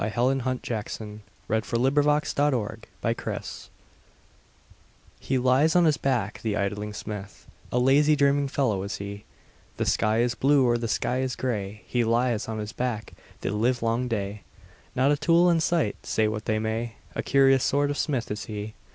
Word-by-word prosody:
Helen 120 +5 +1
Hunt 130 0 -2
Jackson 105 -1 -5 0.3
The 110 +1 +1
Poet's 145 +6 +1
Forge 125 -7 0 2.4
HE 135 - -1
lies 130 +6 +3
on 175 -1 +5
his 155 -3 +3
back, 120 -6 -1
the 110 -2 -1
idling 105 +1 -2
smith, 105 -1 -7 0.3
A - - 0
lazy, 140 +4 +4
dreaming 140 0 +3
fellow 125 -8 0
is 100 +4 -4
he; 100 +1 -7 0.5
The - - 0
sky 110 +2 +2
is 120 0 +1
blue, 135 +1 +3
or 120 -1 +2
the 115 - -2
sky 125 +3 0
is 130 -1 -1
gray, 105 -4 -3
He 120 -1 0
lies 115 0 +1
on 110 -1 -4
his 105 +1 -5
back 120 -4 -3 0.3
the - - -2
livelong 115 +2 0
day, 105 -3 -3 0.5
Not 135 +2 +3
a 145 - +2
tool 170 +4 +4
in 165 - +3
sight, 160 -8 0
say 110 - +1
what 110 0 -3
they 110 - +1
may, 110 +1 -2 0.2
A - - -2
curious 135 -1 +4
sort 145 +1 +2
of 145 - -3
smith 130 -8 -1
is 105 - -4
he. 105 0 -6
120 Hz, 170 wpm, -26 LUFS, 110-135 Hz, 2.4 s, on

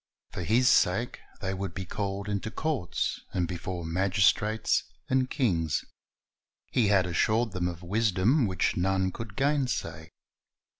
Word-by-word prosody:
For - - -5
His 115 +8 +3
sake 115 0 +3 0.2
they 95 -1 -2
would 95 -2 -4
be 95 - -4
called 100 +2 -3
into 100 +1 -2
courts, 135 - -2
and 90 -2 +1
before 90 0 -5
magistrates 100 +5 +2 0.3
and 130 0 +1
kings. 85 - 0 0.9
He 115 -4 +3
had 100 -2 +4
assured 110 +6 +1
them 90 -2 -1
of 85 0 -6
wisdom 110 - +2
which 95 -2 0
none 95 +1 +1
could 110 0 -8
gainsay. 125 - -1
100 Hz, 135 wpm, -28 LUFS, 90-115 Hz, 0.9 s, had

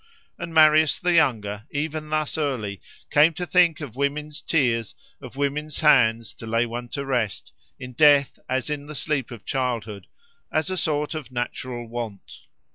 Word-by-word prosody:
And 170 -1 -5
Marius 155 -1 +5
the 180 0 +1
younger, 105 -10 +1
even 155 +1 -3
thus 155 -1 -1
early, 125 -11 -2 0.3
came 155 +2 +5
to 180 - -3
think 175 -3 +3
of 130 -6 -7
women's 150 +2 -2
tears, 120 -10 0 0.3
of - - -10
women's 145 +2 -2
hands 115 -7 +4
to 115 - -8
lay 115 +1 +1
one 120 +1 -6
to 140 - -3
rest, 120 -6 -2 0.3
in 125 -1 -8
death 145 0 +4
as 130 +3 -1
in 145 -1 -4
the 150 - -8
sleep 145 -3 -2
of 120 -4 -10
childhood, 115 -6 -3 0.4
as 155 +4 0
a - - -1
sort 150 -2 -1
of 150 -6 -7
natural 120 -1 -4
want. 115 -4 -7
140 Hz, 165 wpm, -24 LUFS, 120-155 Hz, 0.4 s, Marius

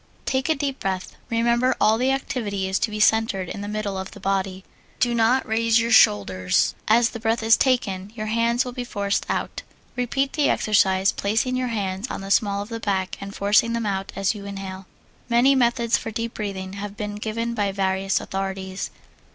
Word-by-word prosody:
Take 265 +3 0
a 315 - +3
deep 275 -1 -3
breath. 190 -1 -3
Remember, 235 +2 +2
all 220 +1 +4
the 255 +1 +2
activity 235 -8 -2
is 190 +1 0
to - - 0
be 215 0 -5
centered 215 -4 +2
in 200 - -6
the 205 - -5
middle 205 -2 -3
of 190 - -5
the - - -11
body; 190 -1 -1 0.4
do 240 -1 +2
not 235 +3 +2
raise 225 0 +2
the 230 0 +1
shoulders. 95 - +4
As 230 +2 +4
the 230 - -7
breath 225 +1 0
is 225 +1 +6
taken 205 -8 0
your 215 -2 -4
hands 230 +3 +1
will 250 - -4
be 245 0 -5
forced 200 -4 -2
out. - - -2 0.3
Repeat 270 +3 -1
the 295 -2 +2
exercise, 190 -2 +3
placing 225 +5 0
your 255 0 -1
hands 200 0 -3
on - - -5
the 195 0 -6
small 200 -1 +2
of 205 - -13
the 230 -1 -5
back 190 -3 -1
and 200 0 -7
forcing 210 +3 +3
them 230 -1 -1
out 195 -1 -2
as 195 +1 +1
you 205 -2 -9
inhale. 195 -1 -7 0.4
Many 240 +4 +5
methods 235 -2 +2
for - - -5
deep 230 +1 -4
breathing 195 -3 -5
have 200 0 -6
been 205 0 -4
given 230 +2 -3
by 205 -3 0
various 195 0 0
authorities. 190 0 -4
215 Hz, 200 wpm, -23 LUFS, 195-235 Hz, 0.4 s, is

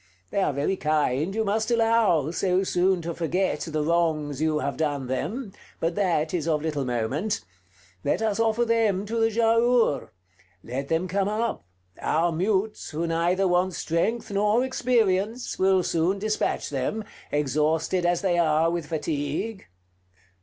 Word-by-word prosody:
They 200 - +1
are 170 - +2
very 145 +7 -1
kind, 155 +3 0
you 220 0 0
must 220 +2 0
allow, 225 - +3
so 185 +1 +1
soon 180 -1 +1
to 170 +1 -3
forget 175 +3 -1
the 155 -2 -2
wrongs 155 -3 0
you 155 -1 +2
have 140 -2 -2
done 145 -4 -1
them: 200 - -3 0.3
but 165 +1 0
that 170 -5 0
is 165 -3 -1
of 155 -2 +1
little 150 -4 -1
moment. 130 - -1 0.6
Let 145 - +1
us 215 -1 0
offer 230 +1 +2
them 220 -4 +1
to 230 +2 -2
the 225 0 +3
Giaour. 230 - +2 0.5
Let 135 +4 -4
them 165 +4 0
come 195 +2 0
up: 215 - -2 0.4
our 165 +3 +1
mutes, 195 +5 -1
who 160 +3 -2
neither 170 +3 +1
want 180 +1 +1
strength 210 +8 -1
nor 210 +4 +2
experience, 230 -3 0
will 190 -1 +3
soon 175 +4 +1
dispatch 215 -5 -1
them, 140 +11 -2 0.3
exhausted 155 +5 +1
as 175 0 +1
they 175 -3 +2
are 160 0 +3
with 170 -3 -3
fatigue." 155 +6 -3
175 Hz, 155 wpm, -25 LUFS, 155-210 Hz, 0.6 s, allow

